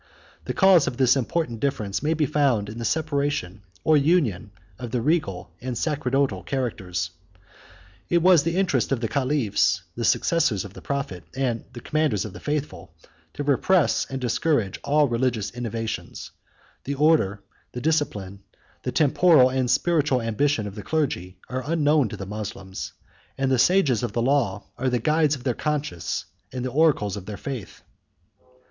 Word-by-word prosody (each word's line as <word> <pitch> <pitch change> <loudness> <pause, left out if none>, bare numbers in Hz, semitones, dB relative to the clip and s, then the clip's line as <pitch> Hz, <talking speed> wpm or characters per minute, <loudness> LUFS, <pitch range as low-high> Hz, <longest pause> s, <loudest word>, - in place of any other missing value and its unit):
The - - -3
cause 190 -5 +5
of 125 -1 -3
this 130 -1 +4
important 130 -2 -1
difference 105 -7 -1
may 155 +2 +1
be 155 -1 +1
found 130 -8 +1
in 110 +2 -7
the 115 - -3
separation 140 - -1 0.2
or 155 - +4
union 140 - +1 0.3
of 120 - -5
the 125 - -1
regal 115 - -1
and 125 -1 -4
sacerdotal 135 - 0
characters. 95 -7 -3 1.0
It 170 -1 +2
was 180 -4 +6
the 165 +3 -1
interest 175 -12 +1
of 135 - +1
the 115 - -1
caliphs, 130 -3 +1
the - - -3
successors 130 - +2
of 100 - -10
the - - -11
prophet 135 -11 -4
and 125 -4 -2
commanders 125 -4 -1
of 105 - -7
the - - -9
faithful, 150 -1 -4 0.4
to 145 - -3
repress 145 +4 +2
and 135 - -4
discourage 125 - 0
all 150 0 +3
religious 120 -4 -1
innovations: 115 -2 -5 0.5
the 140 - -3
order, 135 -10 +2 0.3
the 125 - -4
discipline, 105 -11 -1 0.4
the - - -3
temporal 150 -2 +5
and 130 -1 0
spiritual 150 -1 +2
ambition 115 +1 0
of 100 - -6
the 105 - -7
clergy, 100 - -2
are 130 0 -4
unknown 150 -6 +3
to - - -7
the 95 - -6
Moslems; 100 -2 -6 0.4
and 135 0 0
the 130 - +3
sages 150 - +3
of 120 -4 -3
the 120 - 0
law 120 -7 +1 0.2
are 130 +1 +1
the 125 - +1
guides 150 +4 +2
of 130 - -11
their 125 - 0
conscience 150 - -3 0.3
and 125 -1 -4
the 130 - -3
oracles 135 - +2
of 100 -2 -8
their 105 -2 -5
faith. 130 -7 -7
130 Hz, 165 wpm, -24 LUFS, 110-150 Hz, 1.0 s, was